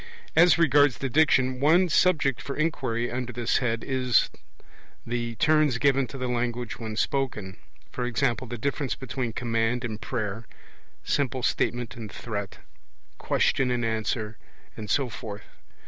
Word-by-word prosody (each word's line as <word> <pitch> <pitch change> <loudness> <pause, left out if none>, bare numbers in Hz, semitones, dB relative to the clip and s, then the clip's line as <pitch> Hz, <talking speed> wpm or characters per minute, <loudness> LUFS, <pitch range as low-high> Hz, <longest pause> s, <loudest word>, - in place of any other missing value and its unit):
As 175 +2 +6
regards 145 -5 +4
the 135 - -3
Diction, 130 -3 +3
one 165 +6 +4
subject 155 -6 +2
for 140 - -5
inquiry 130 -7 -1
under 125 0 -3
this 120 -1 0
head 115 -3 -1
is 130 -2 +2 0.7
the 120 -1 -3
turns 155 -2 +3
given 135 0 +2
to 135 - -8
the 130 -1 -2
language 120 -1 -2
when 110 -2 -5
spoken; 115 -9 -1 0.5
e.g. 120 -2 -2 0.3
the 120 +1 -5
difference 140 +1 -1
between 130 -2 -4
command 115 +1 -1
and 110 -2 -5
prayer, 110 -2 -4 0.6
simple 130 -3 -1
statement 120 -1 -1
and 110 -4 -8
threat, 105 -4 -5 0.6
question 135 -2 +1
and 120 -1 0
answer, 110 -1 -2 0.4
and 105 -1 -7
so 135 +4 +2
forth. 105 -3 -7
125 Hz, 140 wpm, -26 LUFS, 115-135 Hz, 0.7 s, As